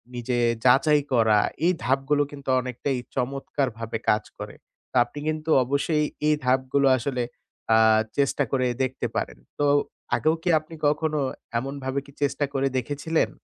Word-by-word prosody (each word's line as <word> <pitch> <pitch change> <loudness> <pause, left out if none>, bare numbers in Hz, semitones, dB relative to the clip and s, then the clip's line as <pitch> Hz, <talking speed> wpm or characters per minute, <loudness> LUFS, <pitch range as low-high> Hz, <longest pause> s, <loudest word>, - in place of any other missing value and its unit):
নিজে 120 0 -2 0.3
যাচাই 145 +4 +5
করা 110 -3 +4 0.3
এই 180 - +4
ধাপগুলো 135 +4 +2
কিন্তু 140 -2 -8
অনেকটাই 125 +2 -3 0.2
চমৎকারভাবে 125 -3 -2
কাজ 105 +1 +3 0.2
করে। - - -7 0.4
তা - - 0
আপনি 145 - -9
কিন্তু 155 0 -3
অবশ্যই 140 +4 0 0.2
এই 150 - +4
ধাপগুলো 130 +2 +2
আসলে 125 0 -2 0.5
আ - - +6 0.4
চেষ্টা 140 0 +2
করে 130 -2 +1 0.2
দেখতে 130 0 -2
পারেন। - - -2 0.2
তো 145 - +2 0.5
আগেও 155 +1 +2
কি 180 - 0
আপনি 155 +1 -12
কখনো 150 +1 0 0.4
এমনভাবে 135 +1 -3
কি 140 - -15
চেষ্টা 145 +1 0
করে 135 0 +1
দেখেছিলেন? 145 +6 -1
135 Hz, 145 wpm, -25 LUFS, 125-145 Hz, 0.5 s, আ